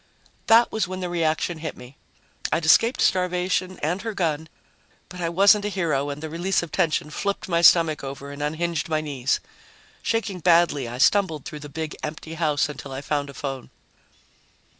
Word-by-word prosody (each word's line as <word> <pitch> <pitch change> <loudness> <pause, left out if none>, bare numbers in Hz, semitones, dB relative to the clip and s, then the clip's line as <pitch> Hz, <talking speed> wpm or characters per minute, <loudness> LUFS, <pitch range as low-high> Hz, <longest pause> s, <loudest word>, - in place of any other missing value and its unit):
That 230 +1 +6
was 220 -3 -1
when 185 0 -5
the 180 -1 -3
reaction 165 0 -1
hit 160 -1 -5
me. 125 +2 -13 0.6
I'd 160 - 0
escaped 230 +10 +4
starvation 180 0 +1
and 175 +5 0
her 225 0 -5
gun, 160 -3 -1 0.6
but 180 0 -8
I 165 - 0
wasn't 200 +4 +5
a - - 0
hero 160 -8 -1
and 145 +2 -6
the - - -3
release 175 +3 0
of 170 - -8
tension 155 -2 0
flipped 200 +5 -3
my 170 -2 +1
stomach 165 -3 +5
over 140 +1 -7
and 145 0 -8
unhinged 160 +3 -2
my 155 -1 +1
knees. 140 -4 -1 0.6
Shaking 225 -5 -1
badly, 170 -6 +3
I 120 +1 -6
stumbled 160 0 +2
through 150 - -7
the 145 0 -9
big, 155 +2 -5
empty 155 +1 -6
house 155 -3 +1
until 145 -2 -8
I 135 +1 -5
found 145 0 -2
a 140 - -11
phone. 135 -2 -5
160 Hz, 185 wpm, -24 LUFS, 145-180 Hz, 0.6 s, That